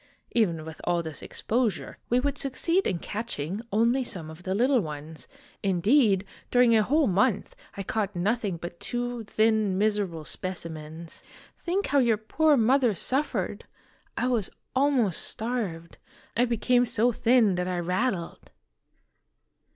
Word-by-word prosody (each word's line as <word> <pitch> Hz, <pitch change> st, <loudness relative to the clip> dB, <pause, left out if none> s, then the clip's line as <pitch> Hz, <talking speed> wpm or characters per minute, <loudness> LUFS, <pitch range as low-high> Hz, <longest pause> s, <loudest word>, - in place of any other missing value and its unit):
Even 170 Hz, -9 st, +1 dB
with 160 Hz, -1 st, -9 dB
all 175 Hz, -1 st, +1 dB
this 160 Hz, -2 st, -7 dB
exposure, 230 Hz, -2 st, -2 dB
we 245 Hz, -, +3 dB
would 280 Hz, +2 st, -1 dB
succeed 330 Hz, +7 st, 0 dB
in 185 Hz, -, 0 dB
catch 220 Hz, +7 st, -5 dB
ing 165 Hz, +9 st, -3 dB
only 235 Hz, +5 st, +3 dB
some 170 Hz, -9 st, -4 dB
of 160 Hz, +2 st, -12 dB
the 190 Hz, +1 st, -2 dB
little 255 Hz, +4 st, +3 dB
ones; 155 Hz, -3 st, -7 dB, 0.3 s
indeed, 200 Hz, +2 st, +3 dB, 0.2 s
during 245 Hz, -2 st, +5 dB
a 220 Hz, -, +5 dB
whole 295 Hz, +8 st, +2 dB
month 205 Hz, +2 st, +1 dB, 0.2 s
I 195 Hz, -, -3 dB
caught 205 Hz, 0 st, -2 dB
nothing 200 Hz, 0 st, 0 dB
but 170 Hz, +1 st, -8 dB
two 245 Hz, -1 st, -3 dB
thin 215 Hz, -2 st, +2 dB
miserable 200 Hz, -6 st, 0 dB
specimens. 165 Hz, -3 st, -6 dB, 0.4 s
Think 375 Hz, +3 st, -1 dB
how 280 Hz, +1 st, +2 dB
your 235 Hz, -4 st, +3 dB
poor 295 Hz, +8 st, +2 dB
mother 245 Hz, -1 st, +3 dB
suffered! 270 Hz, -, -2 dB, 0.5 s
I -, -, 0 dB
was 240 Hz, -6 st, +1 dB, 0.3 s
almost 260 Hz, -, +2 dB
starved. 210 Hz, -8 st, -4 dB, 0.4 s
I 240 Hz, -, +4 dB
became 245 Hz, +1 st, +2 dB
so 230 Hz, +3 st, +2 dB
thin 235 Hz, -3 st, +3 dB
that 180 Hz, 0 st, -1 dB
I 180 Hz, -1 st, -1 dB
rattled 180 Hz, +1 st, -2 dB
215 Hz, 145 wpm, -27 LUFS, 180-245 Hz, 0.5 s, during